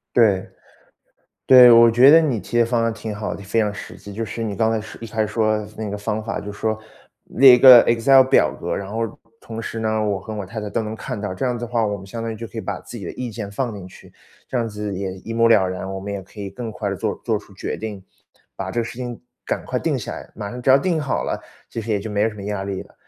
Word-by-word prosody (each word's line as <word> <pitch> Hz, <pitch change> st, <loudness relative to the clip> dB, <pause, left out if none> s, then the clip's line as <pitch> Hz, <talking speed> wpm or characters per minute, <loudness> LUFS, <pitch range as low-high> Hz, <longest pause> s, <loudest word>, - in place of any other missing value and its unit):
对， 105 Hz, -6 st, +4 dB, 1.0 s
对， 125 Hz, -2 st, +9 dB
我 115 Hz, 0 st, +8 dB
觉 125 Hz, +4 st, +7 dB
得 160 Hz, +2 st, +8 dB
你 145 Hz, -8 st, 0 dB
提 110 Hz, +5 st, -3 dB
的 120 Hz, -, +5 dB
方 115 Hz, 0 st, +1 dB
案 115 Hz, -, 0 dB
挺 110 Hz, 0 st, -6 dB
好 105 Hz, +1 st, -4 dB
的， -, -, -8 dB
就 95 Hz, -, -14 dB
非 115 Hz, -, 0 dB
常 105 Hz, -2 st, +1 dB
实 105 Hz, -, -9 dB
际。 100 Hz, -, -11 dB
就 115 Hz, -, -4 dB
是 115 Hz, +1 st, -5 dB
你 105 Hz, -2 st, -3 dB
刚 110 Hz, +2 st, +1 dB
才 115 Hz, -, 0 dB
是 110 Hz, -, -9 dB
一 115 Hz, -, -6 dB
开 110 Hz, 0 st, -1 dB
始 105 Hz, -, -2 dB
说 110 Hz, -1 st, +1 dB
的 105 Hz, -, -5 dB
那 110 Hz, -1 st, -3 dB
个 100 Hz, -, -4 dB
方 105 Hz, +1 st, -3 dB
法， 110 Hz, -, -4 dB
就 105 Hz, -, -7 dB
说， 110 Hz, +1 st, -2 dB, 0.5 s
列 130 Hz, 0 st, +7 dB
一 -, -, +4 dB
个 125 Hz, -3 st, +10 dB
excel 130 Hz, +3 st, +6 dB
表 130 Hz, +1 st, +3 dB
格， -, -, -4 dB
然 100 Hz, -, -5 dB
后 115 Hz, -1 st, -3 dB, 0.2 s
同 115 Hz, -1 st, -7 dB
时 115 Hz, -, -5 dB
呢， 110 Hz, -1 st, 0 dB
我 100 Hz, -2 st, -1 dB
和 110 Hz, +3 st, -7 dB
我 105 Hz, -2 st, -4 dB
太 110 Hz, +4 st, -6 dB
太 105 Hz, -, -5 dB
都 115 Hz, -, -2 dB
能 110 Hz, 0 st, -5 dB
看 110 Hz, -, -6 dB
到， 100 Hz, -2 st, -4 dB
这 95 Hz, -, -4 dB
样 125 Hz, -1 st, -1 dB
的 120 Hz, -, -5 dB
话， 115 Hz, -2 st, 0 dB
我 105 Hz, -, -2 dB
们 95 Hz, 0 st, -11 dB
相 115 Hz, +3 st, -6 dB
当 115 Hz, -, -3 dB
于 110 Hz, -, -5 dB
就 115 Hz, -, -7 dB
可 115 Hz, -, -9 dB
以 -, -, -1 dB
把 95 Hz, -1 st, -4 dB
自 120 Hz, -, -10 dB
己 100 Hz, -, -8 dB
的 -, -, -4 dB
意 125 Hz, -2 st, -5 dB
见 105 Hz, -2 st, -6 dB
放 115 Hz, +1 st, -3 dB
进 95 Hz, -2 st, -9 dB
去， -, -, -16 dB, 0.3 s
这 130 Hz, -, -2 dB
样 115 Hz, -1 st, -1 dB
子 105 Hz, -1 st, -5 dB
也 95 Hz, 0 st, -3 dB
一 115 Hz, -, -5 dB
目 115 Hz, 0 st, +3 dB
了 105 Hz, -5 st, +5 dB
然， 95 Hz, +1 st, -5 dB
我 95 Hz, -, -4 dB
们 100 Hz, +1 st, -6 dB
也 100 Hz, -, -4 dB
可 95 Hz, +3 st, -17 dB
以 100 Hz, -1 st, -5 dB
更 115 Hz, +3 st, -6 dB
快 105 Hz, -1 st, -4 dB
地 100 Hz, -, -3 dB
做 -, -, -2 dB
做 -, -, 0 dB
出 -, -, -17 dB
决 -, -, -4 dB
定， 105 Hz, -4 st, -6 dB, 0.5 s
把 -, -, -5 dB
这 -, -, -3 dB
个 -, -, -2 dB
事 120 Hz, +2 st, -8 dB
情 120 Hz, -2 st, -5 dB, 0.3 s
赶 -, -, -2 dB
快 -, -, -2 dB
定 -, -, -1 dB
下 -, -, -6 dB
来， -, -, -9 dB
马 105 Hz, -2 st, -6 dB
上 125 Hz, -, -7 dB
只 125 Hz, -, -3 dB
要 130 Hz, -, +8 dB
定 165 Hz, +3 st, 0 dB
好 140 Hz, -3 st, -2 dB
了， -, -, -3 dB, 0.3 s
其 115 Hz, -, -4 dB
实 110 Hz, -, -6 dB
也 100 Hz, -, +1 dB
就 110 Hz, +2 st, -6 dB
没 105 Hz, +1 st, +1 dB
什 110 Hz, -, -9 dB
么 100 Hz, -, -9 dB
压 100 Hz, -1 st, -3 dB
力 95 Hz, -1 st, -4 dB
了。 -, -, -21 dB
110 Hz, 335 characters per minute, -21 LUFS, 100-115 Hz, 1.0 s, 个